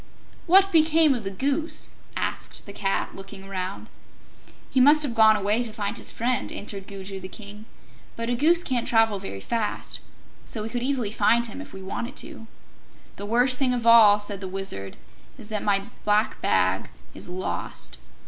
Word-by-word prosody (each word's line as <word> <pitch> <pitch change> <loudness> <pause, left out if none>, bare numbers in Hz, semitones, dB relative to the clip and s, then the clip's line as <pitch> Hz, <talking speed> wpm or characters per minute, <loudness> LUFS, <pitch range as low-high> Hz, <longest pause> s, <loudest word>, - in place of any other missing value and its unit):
"What 385 +3 +6
became 320 -2 +5
of 240 -4 -4
the 195 - -3
Goose?" 280 - -1 0.2
asked - - -3
the 200 - -9
Cat, 195 -1 -2
looking 195 0 -9
around. 190 -1 -5 0.9
"He 265 - +2
must 295 +4 +6
have 270 -5 -1
gone 220 -1 +6
away 210 +3 +1
to 235 -2 -3
find 210 -1 -3
his - - -2
friend," 250 +2 -1
answered 200 -2 -5
Gugu 195 -1 -7
the 185 - -7
King. 210 +1 -10 0.5
"But 230 0 -4
a 245 - 0
Goose 330 +8 +3
can't 250 -6 -1
travel 225 -3 +3
very 100 - -7
fast, 220 - -3 0.4
so 220 -4 -5
we 220 - -4
could 240 +1 -3
easily 250 -5 0
find 230 +2 +3
him 230 +5 -8
if 285 - -11
we 190 0 -9
wanted 235 +6 -5
to." 295 -8 -9 0.7
"The 205 - -6
worst 245 +3 +2
thing 260 -2 +2
of 235 -2 -3
all," 220 -3 +8
said 205 -1 -5
the 190 - -4
Wizard, 185 - -4 0.4
"is 210 - -11
that 215 -1 -2
my 200 -1 +1 0.2
Black 210 +1 +1
Bag - - +1 0.2
is - - -5
lost. 65 - -5
220 Hz, 180 wpm, -25 LUFS, 195-250 Hz, 0.9 s, all